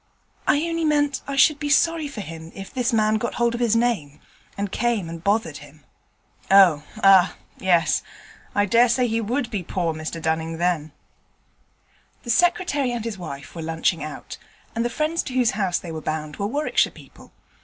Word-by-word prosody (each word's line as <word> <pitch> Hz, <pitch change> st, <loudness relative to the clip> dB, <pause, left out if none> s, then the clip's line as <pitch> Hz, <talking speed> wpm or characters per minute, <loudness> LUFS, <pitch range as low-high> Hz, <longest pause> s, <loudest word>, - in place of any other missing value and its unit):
'I 300 Hz, +3 st, +2 dB
only 330 Hz, 0 st, -2 dB
meant 290 Hz, -3 st, +1 dB
I 280 Hz, -, -3 dB
should 290 Hz, +2 st, +5 dB
be 295 Hz, -, -3 dB
sorry 325 Hz, +1 st, +3 dB
for 275 Hz, -7 st, -7 dB
him 165 Hz, -2 st, -9 dB
if 195 Hz, -1 st, -9 dB
this 250 Hz, -1 st, 0 dB
man 215 Hz, -1 st, +2 dB
got 235 Hz, -, -3 dB
hold 235 Hz, 0 st, +1 dB
of 235 Hz, -, -3 dB
his 230 Hz, -2 st, +2 dB
name, 225 Hz, -12 st, 0 dB, 0.4 s
and 200 Hz, -1 st, -3 dB
came 235 Hz, -6 st, 0 dB
and 165 Hz, 0 st, -8 dB
bothered 200 Hz, -7 st, 0 dB
him.' 145 Hz, +1 st, -15 dB, 0.7 s
'Oh, 185 Hz, -7 st, +6 dB, 0.2 s
ah! 195 Hz, -2 st, +6 dB, 0.2 s
yes. 175 Hz, -3 st, +2 dB, 0.5 s
I 205 Hz, -, +3 dB
dare 235 Hz, +4 st, +4 dB
say 250 Hz, +1 st, +2 dB
he 225 Hz, 0 st, 0 dB
would 240 Hz, +3 st, -2 dB
be 205 Hz, -4 st, -2 dB
poor 175 Hz, -1 st, -2 dB
Mr 155 Hz, +1 st, -5 dB
Dunning 160 Hz, 0 st, -2 dB
then.' 170 Hz, -3 st, 0 dB, 1.3 s
The 235 Hz, -, -2 dB
Secretary 320 Hz, -3 st, +2 dB
and 235 Hz, -2 st, -4 dB
his 215 Hz, -4 st, -5 dB
wife 140 Hz, -5 st, -8 dB
were 170 Hz, -, -6 dB
lunching 160 Hz, 0 st, -1 dB
out, 155 Hz, -, -8 dB, 0.4 s
and 230 Hz, -, 0 dB
the 240 Hz, -, 0 dB
friends 310 Hz, +6 st, -1 dB
to 260 Hz, -, -7 dB
whose 250 Hz, -3 st, +3 dB
house 195 Hz, -3 st, 0 dB
they 170 Hz, -, -7 dB
were 160 Hz, -1 st, -5 dB
bound 155 Hz, -1 st, -4 dB
were 200 Hz, -, -1 dB
Warwickshire 290 Hz, +7 st, +1 dB
people. -, -, -16 dB
205 Hz, 185 wpm, -23 LUFS, 165-245 Hz, 1.3 s, Oh